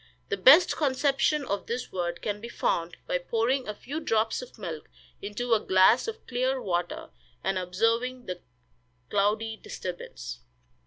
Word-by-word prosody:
The 435 - +1
best 320 +2 +7
conception 280 +1 +2
of 200 -4 -3
this 245 +2 -3
word 175 -2 -3
can 205 -1 -2
be 235 - -7
found 170 -6 -1
by 180 - 0
pouring 235 +8 0
a 210 - -4
few 290 +9 -5
drops 225 -7 +1
of 250 - -11
milk 170 -7 -6 0.3
into 220 +4 -1
a 220 - +5
glass 190 - +4
of 450 0 -6
clear 260 +1 0
water, 175 -6 -2 0.3
and 195 0 0
observing 230 +7 0
the 180 -1 -5 0.7
cloudy 215 +2 +1
disturbance. 60 - -7
225 Hz, 150 wpm, -28 LUFS, 185-255 Hz, 0.7 s, best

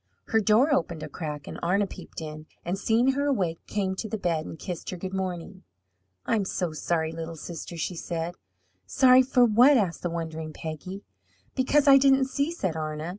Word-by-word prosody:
Her 225 - +4
door 225 +7 +4
opened 170 - -1
a - - -4
crack 150 -4 -6
and - - -7
Arna 195 +4 +2
peeped 190 - -9
in, 155 0 -7 0.2
and 175 +2 -1
seeing 230 +6 +2
her 280 +2 -1
awake, 185 - 0
came 190 -2 -1
to 220 - -4
the 220 - -2
bed 165 -5 -1
and - - -8
kissed 175 +1 -6
her 185 - -4
good 185 +2 -6
morning. 185 0 -4 0.6
"I'm 220 -3 +1
so 180 -3 -2
sorry, 160 +1 -1
little 165 0 -6
sister!" 170 +1 -7
she 165 +3 -3
said. 170 0 -4 0.5
"Sorry 255 - +6
for 255 -1 +4
what?" 245 +6 +6
asked 190 -7 0
the 175 - -2
wondering 160 -2 -5
Peggy. 165 +6 -7 0.5
"Because 280 +2 +2
I 275 0 +9
didn't 270 0 +5
see," 280 +3 -1
said 190 - -2
Arna. 155 +1 -4
185 Hz, 190 wpm, -27 LUFS, 165-235 Hz, 0.6 s, I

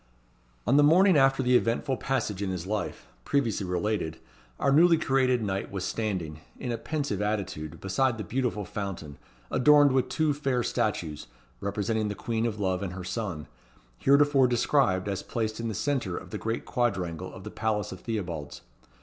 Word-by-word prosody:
On 135 - +4
the 145 - +6
morning 180 +5 +6
after 135 -1 +4
the 125 0 +3
eventful 120 +3 +1
passage 115 -7 -2
in 100 - -1
his 90 -2 -4
life, 105 +2 -3 0.2
previously 115 - 0
related, 90 -2 -1 0.4
our 140 - +2
newly 165 +3 +6
created 130 -5 +2
knight 100 -1 -2
was 95 -2 -4
standing, 90 -9 -3 0.2
in 125 - -4
a 115 - -1
pensive 145 -8 -2
attitude, 100 -8 -3
beside 120 +6 +1
the 105 - -4
beautiful 115 -1 -2
fountain, 90 -8 -6 0.3
adorned 145 +1 +6
with 130 -1 +1
two 155 -2 +1
fair 135 -4 0
statues, 75 - -2 0.3
representing 105 +2 -1
the 105 - -3
Queen 115 +1 -1
of 110 -2 -4
Love 95 -2 0
and 95 -3 -4
her 90 0 -6
son, 90 -6 -4 0.5
heretofore 140 -1 +5
described 120 -5 +2
as 100 -1 -2
placed 110 -2 -3
in 115 - -2
the 110 - -3
centre 125 -8 -1
of 90 - -9
the - - -4
great 115 +1 -3
quadrangle 95 -9 -1
of - - -11
the - - -7
Palace 105 -2 -1
of 95 - -8
Theobalds. 85 -10 -4
110 Hz, 175 wpm, -28 LUFS, 95-135 Hz, 0.5 s, the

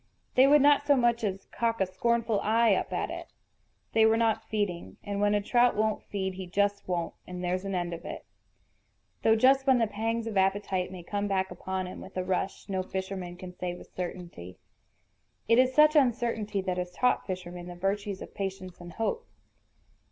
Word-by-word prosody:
They 260 +2 +6
would 290 0 +6
not 290 0 +5
so 285 - +6
much 235 -2 +2
as 195 -2 -2
cock 230 -1 0
a 190 - +3
scornful 225 +3 0
eye 225 0 +4
up - - -1
at - - -2
it. - - -6 0.7
They 220 - +5
were 220 0 +5
not 220 -1 +1
feeding. 180 - -2
And 200 0 -3
when 205 0 +3
a 205 - +2
trout 240 +3 +3
won't 215 0 0
feed 190 -2 -3
he 185 0 -7
just 200 +2 0
won't, 175 -2 -2
and 180 0 -6
there's 185 +2 -1
an 195 -1 -2
end 175 -1 -2
of 170 - -7
it. - - -7 1.0
Though 220 - +5
just 265 +4 +4
when 260 -2 +6
the 230 - +3
pangs 225 +2 -2
of 220 -3 -3
appetite 190 -1 +1
may 180 -2 -8
come 205 +3 -2
back 190 -1 0
upon 185 +1 -4
him 180 - -8
with - - -10
a 185 - 0
rush 190 +1 -2
no 190 -1 -1
fisherman 185 -1 -5
can 180 0 -9
say 180 0 -4
with - - -14
certainty. 175 - -6 0.9
It 230 +2 +5
is 255 0 +4
such 300 +3 +5
uncertainty 230 -6 +1
that 185 -1 -2
has 180 0 -3
taught 250 +8 +1
fishermen 180 -2 -6
the 175 - -8
virtues 195 +2 -2
of - - -12
patience 190 -2 -5
and 175 0 -9
hope. 450 - -2
200 Hz, 200 wpm, -29 LUFS, 185-225 Hz, 1.0 s, They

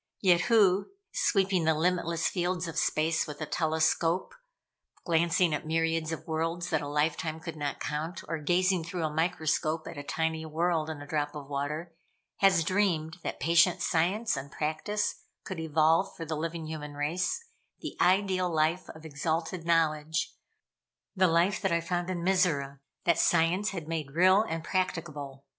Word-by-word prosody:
Yet, 180 -3 +5
who, 200 -4 +4 0.3
sweeping 190 -4 +2
the 160 0 +3
limitless 170 0 +1
fields 180 0 -1
of 165 - -6
space 160 +1 +1
with 145 -1 -7
a 155 - -3
telescope, 160 +3 +1 0.7
glancing 170 0 +2
at 150 - -3
myriads 165 0 0
of 160 - -5
worlds 165 +2 -2
that 160 -1 +1
a 145 - -5
lifetime 155 +2 -1
could 160 0 -7
not 145 -2 -3
count, 155 +4 -4
or 165 0 -3
gazing 180 +3 +2
through 170 +1 -4
a 155 -1 -1
microscope 160 -1 0
at 145 - -7
a - - -6
tiny 160 +2 -1
world 160 0 0
in 150 -2 -6
a - - -12
drop 145 0 -2
of 145 -2 -6
water, 150 +4 -4 0.4
has 190 -4 +4
dreamed 170 -3 0
that - - -4
patient 170 +2 +4
Science 190 +7 +1
and 140 0 -6
practice 160 +9 -2 0.2
could 190 -3 -6
evolve 160 +3 +2
for 165 - -5
the 160 0 -3
living 165 +1 -4
human 150 -2 -6
race, 160 +5 -1 0.4
the - - -6
ideal 185 0 +3
life 165 +2 0
of 160 0 -13
exalted 160 +3 -2
knowledge: 160 -2 +1 0.8
the 185 0 +4
life 175 +4 +2
that 195 -3 0
I 170 - +3
found 175 +1 -2
in 175 -2 -3
Mizora; 160 -7 +1 0.2
that 170 -1 +3
Science 175 +5 +3
had 170 -5 -6
made 160 -4 -3
real 185 +7 +5
and 165 -7 -3
practicable. 150 -7 -3
165 Hz, 165 wpm, -29 LUFS, 155-180 Hz, 0.8 s, Yet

